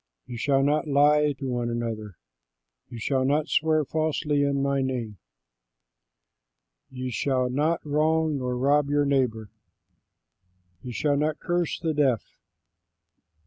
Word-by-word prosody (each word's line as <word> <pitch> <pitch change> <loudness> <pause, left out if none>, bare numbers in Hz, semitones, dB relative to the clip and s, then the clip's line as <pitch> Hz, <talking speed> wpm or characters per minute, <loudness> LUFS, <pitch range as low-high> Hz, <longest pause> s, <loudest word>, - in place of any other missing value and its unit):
You 125 -1 -8
shall 135 +3 +1
not 150 +3 +1
lie 150 +1 +4
to 135 0 -8
one 120 -2 -2
another. 110 -4 -4 0.7
You 120 - -8
shall 130 +4 0
not 145 +4 +1
swear 155 -1 +2
falsely 155 -1 0
in 140 -1 +1
my 140 0 +1
name. 120 -6 -3 1.7
You 130 -1 -5
shall 130 +2 0
not 155 +6 0
wrong 155 0 +1
nor 125 -1 -2
rob 140 +2 +2
your 145 0 +2
neighbor. 125 -6 0 1.3
You 125 - -7
shall 145 +3 0
not 150 +1 0
curse 175 -2 -1
the 165 -2 -1
deaf. 135 -6 +1
140 Hz, 130 wpm, -26 LUFS, 125-150 Hz, 1.7 s, lie